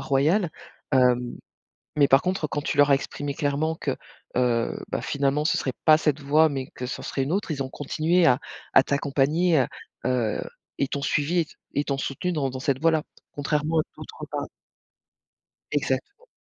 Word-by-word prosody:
royale. 150 +7 +2 0.4
Hem, 125 -2 +3 0.6
mais 145 - +6
par 135 0 +6
contre, 185 -4 0
quand 145 0 -3
tu 150 - -2
leur 145 0 +5
as - - +8
exprimé 140 +1 -3
clairement 150 +2 0
que, - - -3 0.4
heu, 120 -2 +1
bah, - - -2
finalement, 140 +1 0
ce - - +2
serait 130 - -1
pas 155 -1 +8
cette 155 -2 0
voie 150 +3 +4
mais 135 -2 -3
que 125 - -6
ça - - -5
en - - -8
serait 135 - -2
une 140 - -1
autre, 195 -1 -1
ils 140 -3 -1
ont 130 - -6
continué 160 +5 +1
à 125 -5 +5 0.4
à - - +8
t'accompagner, 145 +4 +2
à 130 - +2 0.4
heu, 120 -4 0 0.4
et 140 - +1
t'ont 140 +1 -4
suivie 150 +5 +1
et - - +1
t - - -18 0.2
et 145 +1 +1
t'ont 140 -1 -2
soutenue 180 +7 -2
dans 140 -5 0
dans 130 0 -6
cette 140 -2 0
voie 165 +1 +4
là, 160 -1 +1 0.3
contrairement 150 +2 0
à - - +1
d'autres - - -9
pa - - -3 1.3
Exactement. 425 +4 -2
145 Hz, 195 wpm, -25 LUFS, 135-160 Hz, 1.3 s, as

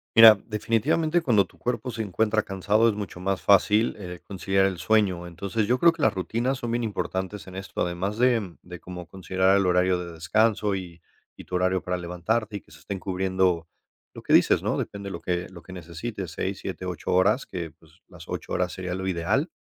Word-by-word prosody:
Mira, 115 -1 +11
definitivamente 140 +10 +1
cuando 115 -10 +3
tu - - -23
cuerpo 125 0 -2
se 115 - -4
encuentra 110 +2 +1
cansado 105 +4 +2
es 105 - -1
mucho 100 -4 -6
más 95 +1 -2
fácil, 105 +3 +4
eh, 90 -3 -7
conciliar 95 0 +1
el 95 -3 -1
sueño. 95 -3 +1
Entonces 100 +5 -2
yo 125 - +3
creo 170 +6 +6
que 165 - -8
las 110 - +4
rutinas 115 +8 -1
son 120 -2 -4
bien 120 0 0
importantes 100 -2 -3
en 95 - -10
esto, 95 0 -7
además 90 +4 -2
de 115 -8 +2
de 90 0 -9
como 90 0 -8
considerar 95 +1 +1
el 100 -2 +2
horario 90 0 +3
de 85 - -8
descanso 105 +5 +1
y 90 -3 -7 0.4
y - - -11
tu 90 - -5
horario 95 0 +1
para 90 - -2
levantarte 90 +5 -2
y - - -7
que - - -25
se 75 - -15
estén 95 +6 -5
cubriendo 95 -2 0 0.5
lo - - -9
que - - 0
dices, - - +5
¿no?, - - -1
depende 100 0 -5
de - - -5
lo - - -6
que 90 0 -2
lo 85 -2 -12
que 90 - -13
necesites, 90 +2 -6
6, 95 +2 -3
7, 95 -1 -6
8 90 -2 -3
horas, 95 +8 +3
que 85 -4 -6
pues - - -24
las - - -13
8 - - -6
horas 90 0 0
sería 90 -1 -4
lo 95 0 -4
ideal, 95 - 0
95 Hz, 215 wpm, -26 LUFS, 90-110 Hz, 0.5 s, Mira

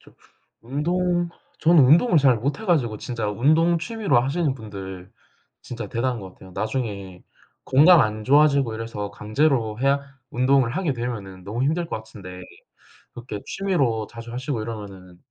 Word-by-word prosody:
저 - - -20 0.5
운동 175 +6 0 0.3
전 170 +1 +4
운동을 160 - +6
잘 135 -4 +4
못 140 +7 -2
해 - - -7
가지고 120 - +1
진짜 115 -4 -3
운동 155 +10 +3
취미로 200 - +1
하시는 140 +3 0
분들 95 -5 -9 0.5
진짜 115 -4 -7
대단한 120 +2 -1
것 95 -2 -10
같아요. 95 - -15
나중에 100 -4 -4 0.4
건강 155 +6 +6
안 110 -1 -2
좋아지고 140 -4 +4
이래서 110 -3 -5
강제로 110 +1 0
해야 140 +1 +2 0.3
운동을 130 0 +2
하게 180 -6 0
되면은 105 -7 -6
너무 110 +6 -3
힘들 165 +4 0
것 - - -4
같은데 95 -4 -10 0.7
그렇게 120 -4 -7
취미로 135 - 0
자주 115 0 -10
하시고 125 -2 -3
이러면은 100 -5 -8
120 Hz, 325 characters per minute, -23 LUFS, 105-150 Hz, 0.7 s, 운동을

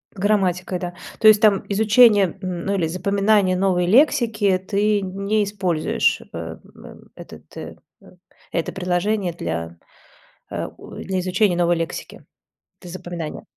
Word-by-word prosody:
Грамматика, 185 -2 0
да. 175 -1 -5 0.3
То 220 - +5
есть 215 -1 +7
там 210 -3 +4
изучение, 210 -2 +4
м 180 -3 -5
ну, 200 - 0
или 175 -4 0
запоминание 200 +2 +1
новой 180 -1 +1
лексики, 220 -5 +3
ты 205 +2 0
не 200 +3 -1
используешь, 190 -6 0
э 80 -1 -6 0.2
м - - -14
этот - - -12 1.1
это 170 - -2
приложение 185 +1 -1
для, 85 - -5 0.7
а - - -4
у - - -12
для 190 -1 -3
изучения 185 +1 +1
новой 175 0 +2
лексики. 165 -1 -6 0.6
Это 180 - -11
запоминание. 175 -3 -7
190 Hz, 130 wpm, -21 LUFS, 175-205 Hz, 1.1 s, есть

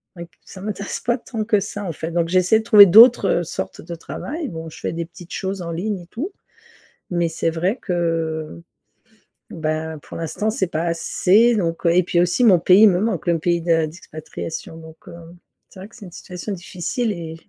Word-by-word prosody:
c'est 170 - -10
vrai - - -6
que 160 - -35
ça 185 - -12
m'intéresse 200 -1 -4
pas 240 +1 0
tant 225 -2 -5
que 210 -2 +2
ça 205 +1 -6
en 175 - -3
fait. 160 - -5
Donc 170 0 0
j'essaie 185 +4 +3
de - - -6
trouver 210 -3 +9
d'autres 215 -3 +6
sortes 95 -11 -6
de 170 +1 -8
travail. 290 - -6
Bon 165 -1 -7
je - - -13
fais - - -3
des 165 0 -4
petites 175 +1 -15
choses 190 0 -4
en 170 -1 -5
ligne 195 +4 -3
et 170 - -15
tout, 290 - -5 0.8
mais 175 -1 0
c'est 165 0 -1
vrai 180 +9 -1
que, 165 - -2 0.9
ben, 155 0 -3
pour - - -9
l'instant 165 +6 -2
c'est 190 -3 -1
pas 165 -2 -3
assez 195 +7 +3
donc, 170 -4 -2
heu, - - +5
et 180 - +4
puis 175 0 +1
aussi 180 +8 +1
mon 185 -6 +6
pays 185 +5 +6
me 180 -2 +2
manque, 215 -4 -2
le 170 -1 +2
pays 170 +1 +1
de 165 -1 +2
d'expatriation. 160 +1 -8
Donc, 160 0 -13
heu, - - -10 0.6
c'est 190 - -15
vrai 195 +3 -10
que - - -19
c'est 210 -5 -12
une 180 - -12
situation 180 +4 -7
difficile 195 - -3
et, 165 -3 -7
175 Hz, 215 wpm, -21 LUFS, 165-205 Hz, 0.9 s, trouver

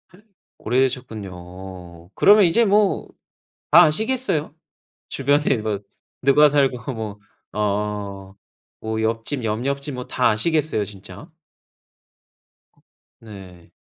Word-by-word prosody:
에. 200 - -20 0.4
오래되셨군요. 95 -8 -4
그러면 205 0 +6
이제 225 +8 +3
뭐 205 0 +2 0.7
다 - - +10
아시겠어요? 170 - -1 0.5
주변에 140 0 +1
뭐 105 -2 -2 0.4
누가 145 +3 +6
살고 135 -3 0
뭐 110 -2 -6 0.3
어 100 -2 -3 0.5
뭐 110 0 -3
옆집, 115 +4 -2
옆 110 +3 -2
옆집 140 0 -3
뭐 125 0 -5
다 125 - +1
아시겠어요, 145 0 0
진짜? 105 - -12 1.9
네. 95 -7 -13
115 Hz, 195 characters per minute, -22 LUFS, 100-145 Hz, 1.9 s, 다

